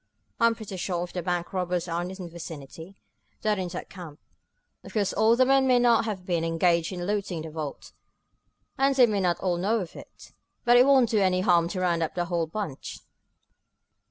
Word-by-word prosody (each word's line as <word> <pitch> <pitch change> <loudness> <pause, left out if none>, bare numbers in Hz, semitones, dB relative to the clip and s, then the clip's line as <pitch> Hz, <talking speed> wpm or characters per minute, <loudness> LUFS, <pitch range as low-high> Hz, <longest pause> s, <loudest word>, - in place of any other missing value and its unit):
I'm 230 -1 +4
pretty 215 -4 -8
sure, 175 -1 -2
if 175 - -8
the 180 - -3
bank 175 +1 -3
robbers 180 -1 -1
are 170 0 -2
in 175 - -4
this 190 +1 -8
vicinity, 165 -1 -9 0.5
they're 210 -2 +1
in 185 - -2
that 175 +1 -7
camp. 170 -6 -10 0.6
Of - - -12
course 205 -3 0
all 220 +2 +4
the 255 +1 +4
men 270 0 +3
there 250 -1 +5
may - - +3
not 235 -2 +4
have 195 -5 -4
been 170 -3 0
engaged 165 +1 +1
in 175 -1 -5
looting 195 -5 -2
the 160 - -8
vault, 150 -2 -6 0.9
and 275 0 +3
they 255 -2 +7
may 210 -3 -1
not 180 -2 +1
all 180 -2 0
know 210 +6 +1
of 180 -5 -7
it, - - -13 0.3
but 240 0 +5
it 250 +2 +6
won't 265 -4 +5
do 220 - +3
any 185 -2 +2
harm 175 -3 +3
to 185 +2 -4
round 170 -2 +1
up 160 - -2
the 175 -1 -1
whole 170 -2 -1
bunch." 165 -6 -6
180 Hz, 215 wpm, -26 LUFS, 170-215 Hz, 0.9 s, they